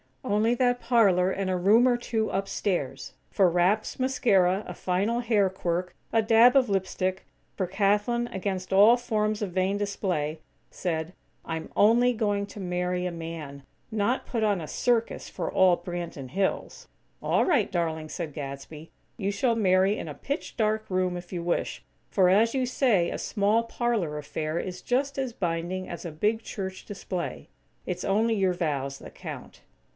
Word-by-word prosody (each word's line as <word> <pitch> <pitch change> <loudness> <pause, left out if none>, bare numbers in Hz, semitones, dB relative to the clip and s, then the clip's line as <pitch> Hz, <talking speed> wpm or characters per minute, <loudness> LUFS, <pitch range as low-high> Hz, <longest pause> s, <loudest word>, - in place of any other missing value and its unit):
Only 215 +4 +2
that 245 0 +2
parlor 200 -8 +3
and 190 0 -2
a 185 - +1
room 215 +7 +5
or 245 -1 +3
two 225 -2 -1
upstairs, 180 -9 -2 0.2
for 190 -3 +3
wraps, 180 +8 +1
mascara, 200 -7 +2
a 180 - -5
final 195 +7 0
hair 215 -5 +2
quirk, 180 -1 -2 0.2
a 225 - +3
dab 230 +3 +6
of 260 -4 +4
lip 195 -1 +1
stick; 185 +1 -2 0.3
for 185 - -1
Kathlyn, 210 +5 +1
against 190 -1 -3
all 210 +5 +7
forms 215 -3 -1
of 195 - -3
"vain 190 +2 0
display," 180 -7 -2 0.3
said: 165 -1 -3 0.3
"I'm 160 -1 -4
only 240 +4 +5
going 205 -3 -1
to 205 - -10
marry 180 -1 -1
a 180 - -1
man; 160 -4 -7 0.3
not 220 +4 0
put 235 -3 -2
on 205 -3 +2
a 155 - -6
circus 235 +4 0
for - - -4
all 185 -2 +4
Branton 175 -6 -6
Hills." 190 +4 -2 0.3
"All - - +2
right, 280 - +2
darling," 160 -3 -2
said 155 -1 -5
Gadsby, 145 +2 -7 0.3
"you 200 -3 -1
shall 230 +4 +1
marry 190 -1 +3
in - - -6
a - - -6
pitch 285 +3 -5
dark 215 0 0
room 185 -1 0
if 175 0 -10
you 175 -1 -3
wish; 170 0 -2 0.3
for, 185 -3 +4
as 225 +6 +3
you 260 -1 +1
say, 240 -8 +2
a - - -4
small, 210 +3 +1
parlor 230 -10 -1
affair 155 +2 -3
is 180 0 -5
just 275 +2 -1
as 260 -3 -2
binding 175 0 -2
as 175 - -7
a 170 - -4
big 210 +8 0
church 190 -4 -6
display. 185 -3 -5 0.4
It's 180 -1 -4
only 220 +4 +2
your 190 -4 +2
vows 140 -6 -2
that - - -11
count." - - -9
195 Hz, 170 wpm, -27 LUFS, 175-225 Hz, 0.4 s, all